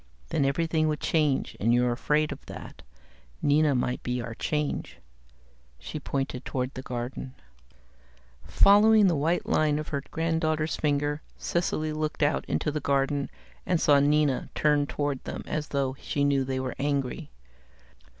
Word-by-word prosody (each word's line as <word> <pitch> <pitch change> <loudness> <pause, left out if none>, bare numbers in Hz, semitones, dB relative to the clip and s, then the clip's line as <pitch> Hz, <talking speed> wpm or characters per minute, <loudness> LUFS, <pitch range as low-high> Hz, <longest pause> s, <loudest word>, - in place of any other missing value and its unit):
Then 140 - +1
everything 160 +2 +1
would 150 -1 -1
change, 150 -4 +1
and 115 +3 +2
you're 125 0 +2
afraid 150 +5 +1
of - - -7
that. - - -9 0.6
Nina 145 0 +3
might 125 0 -1
be 125 0 -2
our 120 -1 -5
change." 150 +5 -2 0.8
She 155 - -6
pointed 135 -2 -3
toward 130 0 -3
the 130 - -6
garden. 125 +1 -5 1.1
Following 210 +1 +6
the 175 -3 +3
white 160 +5 0
line 150 -1 +2
of 155 - -4
her 140 -2 -2
granddaughter's 160 -1 0
finger, 145 0 0 0.2
Cecily 155 -3 -1
looked 155 0 -2
out 145 - +1
into 150 - -1
the 150 - -2
garden 140 0 0 0.3
and 175 - +1
saw 145 -2 +5
Nina 145 -1 +2
turn 150 -1 +2
toward 145 -2 -2
them - - -6
as 150 0 -3
though 135 -2 -1
she 145 - -1
knew 140 -1 +2
they 130 0 -2
were 130 -1 -3
angry. 140 +2 -2
145 Hz, 150 wpm, -27 LUFS, 135-155 Hz, 1.1 s, Following